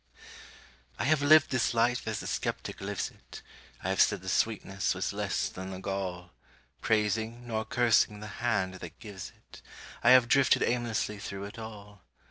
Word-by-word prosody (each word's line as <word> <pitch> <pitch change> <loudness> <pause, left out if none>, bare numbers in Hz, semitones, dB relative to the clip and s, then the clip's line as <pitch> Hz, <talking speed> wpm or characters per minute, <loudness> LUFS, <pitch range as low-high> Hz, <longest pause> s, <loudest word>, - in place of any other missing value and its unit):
I - - -2
have 150 +3 +3
lived 155 +1 +6
this 125 -2 +1
life 120 +1 +1
as 110 -1 -2
the - - -8
skeptic - - -3
lives 100 0 -3
it; - - -13 0.4
I 95 - -1
have 95 - +3
said 100 -3 +3
the 95 - -4
sweetness 95 -1 0
was - - -2
less - - -1
than 95 +1 -7
the 95 -1 -6
gall; 95 -2 -4 0.5
Praising, 110 +2 0
nor 110 -2 -2
cursing, 115 -4 +2
the 105 +1 -9
Hand 95 -6 +1
that - - -9
gives 100 -4 -8
it, - - -16 0.4
I 120 - +6
have 125 -1 +7
drifted 135 +2 +4
aimlessly 115 -3 -1
through 100 0 -6
it 105 +4 -8
all. 105 -3 -10
110 Hz, 170 wpm, -29 LUFS, 95-120 Hz, 0.5 s, have